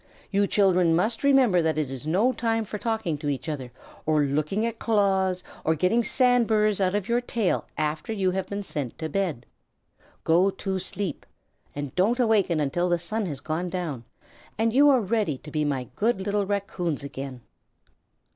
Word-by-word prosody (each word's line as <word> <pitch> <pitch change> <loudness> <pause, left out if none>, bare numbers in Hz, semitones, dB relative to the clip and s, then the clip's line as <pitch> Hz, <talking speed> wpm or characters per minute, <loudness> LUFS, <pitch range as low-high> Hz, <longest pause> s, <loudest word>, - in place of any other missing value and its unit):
You 200 0 +2
children 180 -5 +3
must 220 +8 0
remember 260 -10 +5
that 160 -1 0
it 150 -4 -1
is 135 +2 -7
no 200 +11 +3
time 225 -2 0
for 210 +1 -6
talking 220 -10 -2
to 145 - -2
each 135 -2 -3
other, 135 -5 -4 0.3
or 155 -1 +2
looking 155 +10 0
at 230 -1 -3
claws, 190 -4 +1 0.2
or 160 - +2
getting 185 +9 +2
sand 245 +1 +3
burrs 210 -2 +2
out 185 +1 +2
of 205 -2 -1
your 235 +1 +1
tails 230 -5 -1
after 155 +5 -2
you 195 -4 +1
have 190 0 -2
been 200 0 -3
sent 145 -9 -4
to 160 - -4
bed. 160 -9 -2 0.8
Go 175 +4 +4
to 190 0 -3
sleep, 185 -3 -4 0.5
and 145 -2 -5
don't 210 +7 +2
awaken 210 -8 +3
until 175 +5 0
the 175 - +3
sun 205 +5 -3
has 145 -5 -5
gone 165 +3 -2
down 165 -9 -4 0.5
and 225 +1 +1
you 285 +3 +6
are 260 -3 +5
ready 205 - 0
to 150 - -12
be 150 0 0
my 135 -4 -1
good 220 -1 +1
little 200 0 -1
Raccoons 190 -7 -2
again." 135 -2 -7
185 Hz, 185 wpm, -26 LUFS, 155-215 Hz, 0.8 s, you